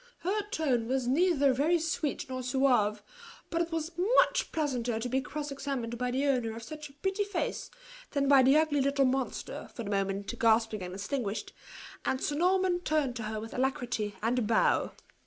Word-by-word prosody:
Her 400 +4 0
tone 265 - 0
was 260 0 0
neither 285 -1 +3
very 305 +7 +2
sweet 325 -3 -2
nor 255 0 -4
suave; 250 -5 +2 0.5
but 335 - +1
it 340 0 -2
was 325 0 -2 0.3
much - - +3
pleasanter 250 -7 -1
to 235 - -3
be 265 +2 +1
cross 290 +2 -5
examined 265 -4 -4
by 250 0 0
the 265 +3 0
owner 245 -5 +1
of 230 - -8
such 300 +4 -8
a - - -18
pretty 385 +7 -1
face 400 -3 -3 0.4
than 280 -1 0
by 275 -1 +7
the 265 +3 +5
ugly 310 -2 +2
little 275 0 +2
monster, 260 0 -2
for 235 - -5
the 205 - -5
moment 200 +3 -2
gasping 225 -2 +3
and 180 0 -6
extinguished; 210 +1 -3 0.5
and 260 - 0
Sir 295 - -1
Norman 365 +3 +2
turned 305 -7 0
to 230 - -5
her 215 0 -3
with 225 +1 -8
alacrity, 245 -5 -1
and 240 +3 +2
a - - 0
bow. 220 0 +2
265 Hz, 190 wpm, -30 LUFS, 230-305 Hz, 0.5 s, by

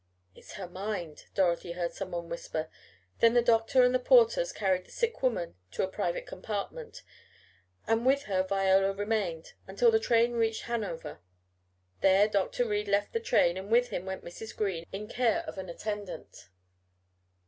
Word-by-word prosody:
"It's - - -14
her 195 -3 -6
mind," 180 -4 -5
Dorothy 175 -2 +1
had - - -14
heard 170 - 0
someone 175 -3 -5
whisper. 160 -2 -4 0.5
Then 230 +1 +5
the 240 - +6
doctor 230 +2 +4
had 250 - +5
the 255 - +2
porters - - +4
carry 190 - +1
the - - -23
sick 465 -1 -2
woman 210 - -1 0.2
to - - -1
a - - +1
private 185 -2 -3
compartment, 215 - -6 0.8
and 225 +1 +1
with 275 +2 +3
her 190 -5 0
Viola 195 0 +2
remained, 200 -5 -2
until 475 -2 +3
the 445 - +4
train 235 - +3
reached 225 -1 0
Hanover. 215 - -4 0.8
There 195 +2 +5
Dr. 210 +4 0
Reed 210 -1 -1
left 200 0 +1
the 460 - +1
train 450 - +2
and 190 +2 -7
with 245 +2 +3
him 190 -3 -4
went 190 0 -5
Mrs. 220 +6 -9
Green 190 -6 -2
in 205 +2 -6
care 250 +9 +1
of 195 - -7
an 185 -1 -6
attendant. 200 - -6
205 Hz, 170 wpm, -29 LUFS, 185-235 Hz, 0.8 s, the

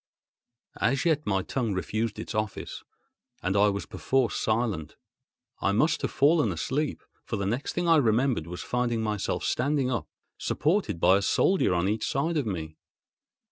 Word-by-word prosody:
As 135 +6 +1
yet 155 -3 +1
my 95 -2 +1
tongue 115 -7 -2
refused 110 +3 -2
its - - -6
office, 110 -1 -4 0.6
and 95 +2 0
I 105 +1 +5
was 100 0 -3
perforce 130 -3 0
silent. 110 -9 -1 0.6
I 100 - +1
must 150 +10 +2
have - - -1
fallen 150 +2 +3
asleep; 150 +2 -2 0.2
for - - -4
the 100 -2 -2
next 120 +8 -2
thing 175 0 -1
I 165 -1 +6
remembered 120 - +2
was 90 +1 -6
finding 120 -2 -1
myself 105 -2 -2
standing 135 0 +1
up, 115 -7 -2 0.3
supported 165 - 0
by 95 +3 +5
a - - -1
soldier 180 - +2
on 85 +2 +1
each 105 +2 -1
side 160 +5 0
of 140 -6 0
me. 80 -5 -4
115 Hz, 165 wpm, -27 LUFS, 100-140 Hz, 0.6 s, I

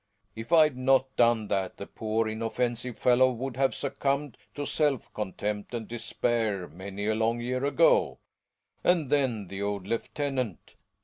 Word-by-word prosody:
If 115 +7 -8
I'd 155 -4 +6
not 130 +1 +2
done 115 -3 +3
that 95 -1 -1
the 100 - -6
poor, 110 +1 -1
inoffensive 120 +2 -2
fellow 130 +1 +4
would 125 +1 -4
have 135 +1 +1
succumbed 140 0 -1 0.2
to 145 - -3
self 145 -5 0
contempt 105 +2 -3
and 115 -2 -4
despair 115 -4 -1
many 95 +5 -6
a 110 - +2
long 115 +2 +1
year 125 +2 -2
ago. - - +3 0.7
And 165 -6 +2
then 125 -8 +1
the 100 +2 -6
old 100 -2 -2
lieutenant 125 - -3
120 Hz, 145 wpm, -28 LUFS, 110-135 Hz, 0.7 s, I'd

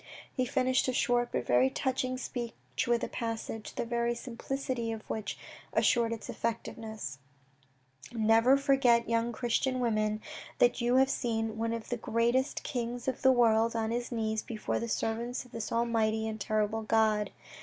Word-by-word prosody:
He 255 - 0
finished 255 +1 +2
a 255 - +1
short 245 -1 +2
but - - -1
very 125 +2 +4
touching 255 - -1
speech 240 -3 -4
with 235 -1 +2
a - - 0
passage, 225 -2 -4
the 240 - -2
very 235 0 0
simplicity 245 0 -3
of 220 -1 -5
which 215 -2 -3 0.4
assured 235 -2 +3
its 230 -2 -5
effectiveness: 220 -9 -4 0.5
" 130 - -20
Never 230 +3 +4
forget, 265 -4 +3
young 230 +1 +1
Christian 255 +2 0
women, 215 -3 +1 0.4
that 245 +1 +3
you 240 +1 +2
have 265 +1 +5
seen 225 -2 -1
one 225 +1 -1
of 230 -1 -4
the 245 - -1
greatest 235 +4 +1
kings 240 -1 -3
of 260 - -1
the 265 - +6
world 230 -2 +4
on 225 0 0
his 240 +1 -2
knees 220 -2 -1
before 220 -2 -3
the 235 - -4
servants 235 +3 -2
of 250 - -18
this 230 -2 -5
Almighty 220 -2 +1
and 220 -1 -5
terrible 215 +2 0
God. 215 -1 +2
230 Hz, 165 wpm, -31 LUFS, 220-245 Hz, 0.5 s, the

